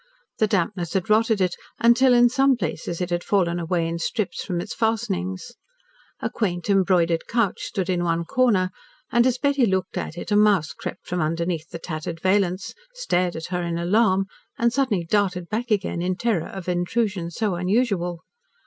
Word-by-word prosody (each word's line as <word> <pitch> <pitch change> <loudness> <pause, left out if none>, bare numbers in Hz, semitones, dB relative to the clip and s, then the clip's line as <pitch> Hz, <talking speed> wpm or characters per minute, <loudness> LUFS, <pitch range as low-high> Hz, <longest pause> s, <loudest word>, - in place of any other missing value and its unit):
The 215 - +4
dampness 180 -3 -1
had 190 +2 -1
rotted 220 0 +3
it 180 -2 +1 0.2
until, 245 +2 +5
in 240 0 +7
some 270 +2 +3
places, 170 -2 -4
it 180 0 -2
had 175 0 0
fallen 175 -4 +1
away 170 0 0
in 165 0 -3
strips 200 +4 -2
from 180 -3 -2
its 200 - -5
fastenings. 215 -2 -2 0.7
A - - 0
quaint, 185 -3 -1
embroidered 180 -4 +2
couch 230 -5 +1
stood 190 -4 -3
in 180 -2 0
one 170 -1 0
corner, 205 -4 +2 0.4
and 240 +1 +4
as 255 -1 +1
Betty 280 -2 +2
looked 190 -1 -1
at 165 - -6
it, 175 - -6
a - - +4
mouse 205 -6 +3
crept - - -7
from 180 0 -2
under 165 +2 0
the 175 -2 -1 0.2
tattered 165 0 -5
valance, 185 0 +1 0.2
stared 180 - 0
at 160 - -5
her 180 - 0
in 170 -1 -2
alarm 190 +2 +2 0.3
and 235 0 +2
suddenly 240 -10 +1
darted 180 -2 0
back 235 +3 -2
again, 200 -5 0
in 180 +1 0
terror 205 -5 0
of 190 -2 -8
intrusion 180 0 -1
so 205 +3 -1
unusual. 180 -2 0
185 Hz, 180 wpm, -23 LUFS, 175-220 Hz, 0.7 s, in